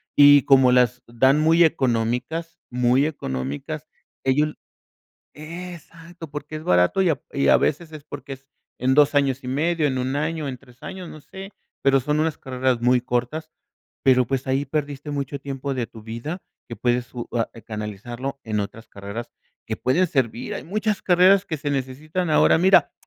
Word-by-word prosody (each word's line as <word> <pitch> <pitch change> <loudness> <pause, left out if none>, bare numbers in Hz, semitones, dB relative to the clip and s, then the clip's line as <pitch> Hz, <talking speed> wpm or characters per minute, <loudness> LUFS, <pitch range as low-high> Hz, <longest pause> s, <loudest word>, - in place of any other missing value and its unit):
Y 145 -1 +8
como 130 -1 +5
las 125 0 +3
dan 130 +5 +3
muy 165 +2 +5
económicas, 130 +5 -1
muy 125 +3 +3
económicas, 65 - -4 0.4
ellos 150 +3 +1 0.8
Exacto, 170 0 -10
porque 150 +1 -6
es 155 - -7
barato 90 - +3
y 185 - +3
a 145 -2 -1
y 140 - +1
a - - +7
veces 155 +2 -1
es 155 -2 -10
porque 135 -1 -7
es 135 0 -20 0.3
en 130 +2 +1
2 145 +1 +5
años 140 -2 +2
y 125 - -5
medio, 155 +3 +1
en 130 -2 -1
1 130 +1 -1
año, 155 0 -2
en 130 -2 -5
3 125 -1 -21
años, 185 -2 -7
no 155 - -10
sé, 195 +5 -10 0.3
pero 135 0 +4
son 150 +4 0
unas 160 -2 0
carreras 130 -1 -1
muy 125 +1 +3
cortas, 125 +6 -2 0.5
pero, 130 -2 +5
pues, 135 +2 -2
ahí 135 +2 +1
perdiste 145 0 -3
mucho 140 0 -3
tiempo 140 0 -4
de 120 -3 -2
tu 110 - -13
vida 115 - -6 0.3
que 115 - -7
puedes 120 0 -1
u 120 -1 -5
ah, 115 -2 0 0.2
canalizarlo 120 +5 -5
en 110 -1 -2
otras 110 +3 -7
carreras 100 +4 -7 0.4
que - - -3
pueden 165 +9 +2
servir. 130 -5 -1
Hay - - -6
muchas 210 +2 -1
carreras 185 +2 +5
que 160 - -3
se 145 0 -3
necesitan 150 +6 -2
Ahora, 150 - +5
mira, 190 +3 +5
135 Hz, 175 wpm, -23 LUFS, 125-155 Hz, 0.8 s, Y